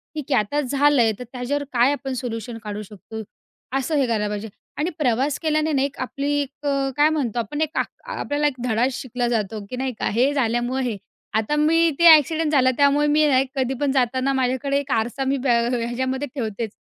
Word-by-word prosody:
ठीक 300 -2 -6
आहे, - - +5
आता 215 +8 -1
झालंय 275 -3 +3
तर, - - -5
त्याच्यावर 260 +4 -2
काय 245 +3 +4
आपण 275 -2 -3
सोल्युशन 235 -2 -5
काढू 210 0 -5
शकतो, 215 +2 -9 0.6
असं 275 +4 -1
हे 275 -3 +3
करायला 215 -2 0
पाहिजे. 210 +1 -4 0.3
आणि 305 +4 0
प्रवास 265 +2 +1
केल्याने 310 -1 0
ना, 270 - +2
एक 280 0 -2
आपली 280 +3 -2
एक 285 +1 -8
अ, 275 -1 +1
काय 300 +1 +5
म्हणतो 255 -7 -1
आपण 265 +7 -3
एक 315 0 -2
आ - - +3 0.4
आपल्याला 290 +1 0
एक 275 - -2
धडा 230 +1 +2
शिकला 250 -1 -3
जातो, 215 -3 -2
की - - -5
नाही 260 -1 -2
का? - - 0
हे 255 +7 +2
झाल्यामुळं 240 0 0
हे. 230 -5 -2 0.4
आता 220 +7 0
मी 330 +2 +3
ते 340 - +4
एक्सिडेंट 315 +1 -1
झालं 260 -3 +4
त्यामुळे 285 +1 +4
मी 300 +1 +4
ना 265 -3 +4
एक 265 0 -1
कधी 265 0 0
पण 285 - +2
जाताना 260 +1 +1
माझ्याकडे 260 +2 0
एक 285 -1 -6
आरसा 240 +4 0
मी 275 +1 +1
ब 260 +1 -3
ह 235 +1 +2
ह्याच्यामध्ये 260 +4 -2
ठेवतेच, 220 -3 -3
260 Hz, 210 wpm, -22 LUFS, 235-285 Hz, 0.6 s, आहे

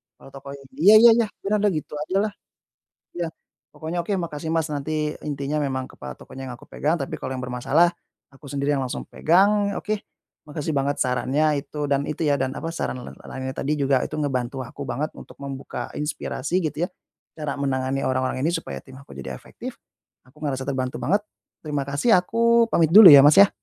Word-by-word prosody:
kalau - - -15
toko 140 0 -9
ini 140 - -14 0.2
iya 200 +6 +7
iya 235 - +9
iya 235 - +3 0.2
piranda 210 +1 +1
gitu 160 -6 -2 0.2
ajalah, 200 +3 0 0.8
ya, 175 -1 -3 0.5
pokoknya 165 +2 -4
oke 195 +4 -1
makasih, 165 -3 -4
Mas, 160 -1 0
nanti 150 +1 -2
intinya 145 0 -3
memang 130 -2 -1
kepada 65 -1 -9
tokonya 135 0 -10
yang 125 - -6
aku - - -17
pegang 155 +4 -1
tapi 140 -5 -5
kalau 130 - -4
yang 125 - -5
bermasalah 135 +7 +2 0.4
aku 135 +2 -15
sendiri 140 +1 -1
yang - - -1
langsung 125 - -4
pegang, 200 +4 +3
oke, 215 0 -2 0.5
makasih 150 +1 -4
banget 140 +1 0
sarannya 140 +4 +1
itu 150 0 -5
dan 140 0 +1
itu, 150 - -5
ya, 140 - +3
dan 130 0 -1
apa 165 - -5
saran 145 -6 -4
la - - -8
la - - -17
lainnya 130 0 -4
tadi 145 +2 -1
juga 135 -2 +2
itu - - -8
ngebantu 130 -3 -2
aku 135 +3 -8
banget 150 +4 -2
untuk - - -11
membuka 135 -1 -6
inspirasi 150 +3 -2
gitu, 160 +1 -1
ya, - - -10 0.4
cara 150 -3 -4
menangani 135 -1 -1
orang-orang 130 0 -1
ini - - +3
supaya - - -4
tim 130 - -16
aku 105 - -14
jadi 65 0 -6
efektif, 65 - -9 0.5
aku 130 +3 -24
ngerasa 135 -2 -2
terbantu 130 -2 -2
banget 205 +1 +2 0.4
terima 145 -2 -1
kasih 140 - +2
aku 230 +5 +3
pamit 165 -6 +3
dulu, 210 -4 +12
ya, 140 -2 +11
Mas, 150 +6 +6
ya. 200 - +7
145 Hz, 195 wpm, -23 LUFS, 135-165 Hz, 0.8 s, dulu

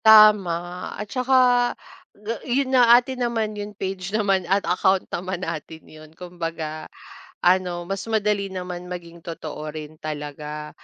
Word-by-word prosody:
Tama 190 -5 +6
at 210 - -4
saka 255 +1 +3 0.8
ga 210 +3 -4
'yun 265 +1 0
nga 240 -2 +8
atin 250 +1 -2
naman 225 -3 0
'yung 205 -1 -7
page 190 -1 -4
naman 195 -4 +1
at 195 +1 +2
account 185 +2 +2
naman 185 +1 -3
natin 160 0 -6
yun 155 0 -14
kumbaga, 165 -3 -5 0.5
ano 180 -1 +2
mas 195 +4 -4
madali 210 -2 +1
naman 180 -2 -6
maging 170 -1 -8
totoo 155 -2 -6
rin 155 0 -8
talaga. 150 0 -6
185 Hz, 140 wpm, -23 LUFS, 165-210 Hz, 0.8 s, nga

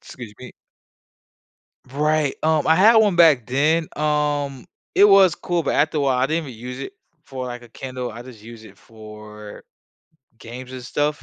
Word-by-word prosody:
Excuse 120 -4 -11
me. 125 - -11 1.4
Right, 150 +1 0
um, 155 -1 +1
I 160 - +5
had 215 +6 +5
1 205 -5 +3
back 150 -9 +4
then, 155 +5 +1
um, 145 -3 -1 0.3
it 200 - +6
was 195 -4 +6
cool, 175 -2 -3
but - - -1
after 155 0 +1
a - - 0
while, 135 -2 +1
I 130 - +1
didn't 160 +1 -1
even 115 -4 -11
use 125 +1 -7
it 165 +8 -7 0.3
for, 130 -2 -7
like, 120 0 -8
a 120 - -16
Kindle. 125 0 -7
I 115 +2 -9
just 120 -4 -14
use 115 -1 -12
it - - -16
for 105 -1 -13 0.8
games 125 +3 -10
and 130 -1 -9
stuff, 150 +4 -2
135 Hz, 180 wpm, -21 LUFS, 120-155 Hz, 1.4 s, it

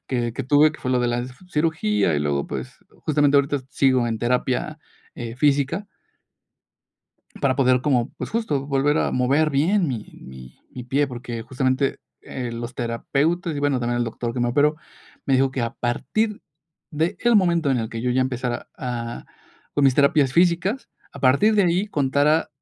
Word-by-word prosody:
que 120 -3 -1
que 135 - -3
tuve, 145 +3 +5
que - - -13
fue 130 - -2
lo 125 - +2
de 120 - +1
la 120 0 -1 0.3
cirugía, 105 - +1
y - - +1
luego, 70 -1 -1
pues, 65 -2 -6 0.2
justamente 145 -2 +1
ahorita, 140 0 0
sigo 130 -3 +2
en 110 -1 -2
terapia, 125 +5 -1 0.4
eh, 120 -1 -6
física. 145 +7 +1 1.5
Para 130 -2 +1
poder 130 -2 +3
como, 130 -3 +1
pues, - - -6
justo, 150 -12 -1
volver 145 +2 +1
a - - 0
mover 140 +5 +2
bien 170 +7 +2
mi 115 -5 -4 0.2
mi 65 -1 -12
mi 125 -1 -8
pie, 140 +3 +1
porque 120 -2 -6
justamente, 130 +3 -1 0.2
eh, 125 -3 -5
los 120 +1 -6
terapeutas, 145 +8 -1
y - - -3
bueno, 140 -3 +1
también 120 0 -1
el 120 - +1
doctor 115 +1 -4
que 125 - -2
me 120 - +1
operó, 145 +4 +2 0.5
me 135 - +3
dijo 135 +1 +3
que 130 -2 -3
a 115 - -3
partir 210 - -2 0.5
del 165 +5 -1 0.2
momento 170 -6 +2
en 130 - +2
el 110 - -3
que 115 - -6
yo 125 - 0
ya 130 - +2
empezara 125 -2 -2
a 120 -2 -5 0.5
con 145 - +2
mis 135 - +5
terapias 140 -1 +3
físicas, 180 - +1 0.2
a - - -10
partir 140 +12 +4
de 205 - +4
ahí 180 +4 +1
contara. 145 0 +2
135 Hz, 180 wpm, -23 LUFS, 120-150 Hz, 1.5 s, tuve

